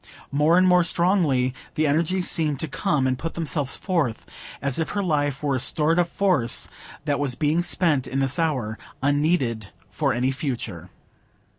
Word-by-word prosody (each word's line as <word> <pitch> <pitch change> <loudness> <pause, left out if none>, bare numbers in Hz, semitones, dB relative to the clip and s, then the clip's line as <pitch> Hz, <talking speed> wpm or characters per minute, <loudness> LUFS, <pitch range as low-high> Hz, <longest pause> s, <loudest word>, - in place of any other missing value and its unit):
More 150 +5 +3
and 185 0 +5
more 180 -1 +5
strongly 165 -8 +2 0.2
the 155 -1 +1
energies 165 +5 +1
seemed 150 -4 0
to 160 - -2
come 140 -3 0
and 130 -1 0
put 165 - -5
themselves 150 -4 0
forth, 165 - -1 0.3
as 140 +1 0
if 160 - -1
her 200 - +1
life 145 -5 -1
were 145 -2 +1
a 130 - 0
stored 150 +6 +2
up 175 - +2
force 175 -11 0 0.4
that 145 -2 0
was 140 -4 -1
being 155 +4 +1
spent 160 -7 +1
in 135 - -3
this 135 +1 0
hour, 130 -10 -1 0.2
unneeded 140 - +1 0.2
for - - 0
any 125 +4 0
future. 120 - -5
145 Hz, 170 wpm, -24 LUFS, 130-165 Hz, 0.4 s, and